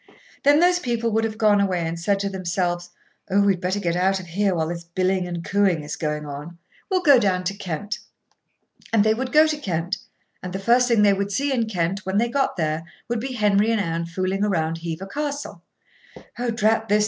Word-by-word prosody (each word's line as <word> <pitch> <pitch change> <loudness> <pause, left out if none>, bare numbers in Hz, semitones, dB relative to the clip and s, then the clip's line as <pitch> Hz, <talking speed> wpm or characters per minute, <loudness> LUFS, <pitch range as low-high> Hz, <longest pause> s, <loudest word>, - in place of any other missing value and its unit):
Then 290 +2 +5
those 355 +1 +4
people 235 -5 -1
would 225 +1 +1
have 220 -1 -4
gone 210 -2 +4
away 180 -4 0
and 165 +1 -3
said 200 +4 +1
to 200 - -1
themselves: 175 -2 -2 0.4
"Oh! 200 +1 +3
we'd 195 -3 +2
better 185 +3 -1
get 175 -4 -1
out 190 +2 +2
of 185 - -9
here 190 +3 0
while 160 -1 -1
this 170 0 -5
billing 185 +2 0
and 170 -1 -5
cooing 195 -6 +2
is 150 - -5
on. 150 +1 -4 0.3
We'll 370 -2 +1
go 285 -6 +7
down 185 -4 +1
to 190 +2 -1
Kent." 200 +1 -4 0.9
And 225 -2 +4
they 220 0 +3
would 255 +3 -3
go 305 +1 +6
to 310 -1 -1
Kent, 180 - -2 0.4
and 180 0 -6
the - - -2
first 240 +5 +3
thing 230 -4 +4
they 200 -1 +5
would 200 +1 -2
see 275 +7 0
in 235 -3 0
Kent, 185 0 -1
when 190 +1 -1
they 235 +2 +2
got 270 -2 0
there, 155 -1 -1 0.3
would 235 -1 0
be 260 +3 -4
Henry 210 -2 +2
and 225 -1 +2
Anne 170 -3 -2
fooling 185 +3 -2
round 165 -5 0
Hever 165 +2 -5
Castle. 285 +6 -4 0.8
"Oh, 245 0 -1
drat 225 -1 +1
this!" 210 +1 +4
195 Hz, 215 wpm, -23 LUFS, 175-225 Hz, 0.9 s, go